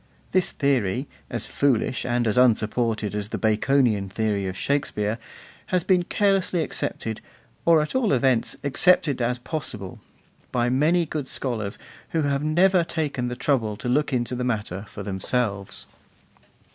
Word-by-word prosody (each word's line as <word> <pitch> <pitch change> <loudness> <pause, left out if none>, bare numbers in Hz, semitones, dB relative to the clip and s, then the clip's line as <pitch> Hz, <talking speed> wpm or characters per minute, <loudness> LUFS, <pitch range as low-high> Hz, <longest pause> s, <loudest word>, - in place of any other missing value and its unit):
This 185 -1 +2
theory, 130 -3 0 0.2
as - - -4
foolish 130 -3 0
and 120 0 +1
as 110 - +1
unsupported 115 -3 +2
as 105 0 -3
the - - -3
Baconian 110 -2 +2
theory 100 -1 -1
of 95 0 -5
Shakespeare, 115 -6 -1 0.5
has 180 -2 +1
been 185 -1 +3
carelessly 195 -4 +1
accepted, 110 -6 -3 0.4
or 165 -2 +5
at 150 - -6
all 260 -5 +2
events 130 -3 +2
accepted 145 -1 +3
as 125 +1 +1
possible, 120 - -6 0.5
by 120 0 +1
many 160 +6 +3
good 150 -3 -4
scholars 110 -8 -2 0.4
who 160 -2 +2
have 140 0 0
never 175 +4 +4
taken 150 -6 -2
the 125 - -3
trouble 120 -5 0
to 115 - -5
look 145 +5 +1
into 125 -1 -1
the 125 0 -2
matter 105 -5 -2
for - - -8
themselves. 100 0 -2
125 Hz, 145 wpm, -24 LUFS, 110-150 Hz, 0.5 s, or